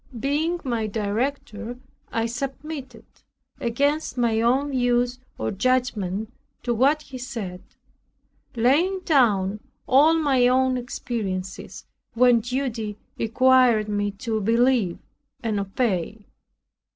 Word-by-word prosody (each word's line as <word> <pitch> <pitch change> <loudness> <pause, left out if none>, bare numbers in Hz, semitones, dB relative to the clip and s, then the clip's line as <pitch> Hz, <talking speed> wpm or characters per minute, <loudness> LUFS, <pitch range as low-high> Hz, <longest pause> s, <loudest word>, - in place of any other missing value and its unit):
Being 310 +7 0
my 235 -5 -1
director, 225 +2 -3 0.3
I 225 0 0
submitted, 265 +1 -6 0.5
against 285 +4 0
my 230 -2 +2
own 265 +5 +2
views 245 -1 +1 0.2
or 110 - -2
judgment, 220 -3 -1 0.3
to 240 - 0
what 280 +6 +3
he 260 -3 -9
said, 225 -8 -6 0.9
laying 310 +12 +2
down 210 - +2 0.3
all 295 +5 +5
my 275 -6 +3
own 260 +1 +3
experiences 195 -6 -5 0.3
when 245 0 +5
duty 230 -3 -3 0.2
required 245 -1 +4
me 205 -1 0 0.2
to 220 -2 0
believe 230 -3 +2 0.5
and 215 -3 0
obey. 200 0 -2
240 Hz, 105 wpm, -24 LUFS, 215-265 Hz, 0.9 s, all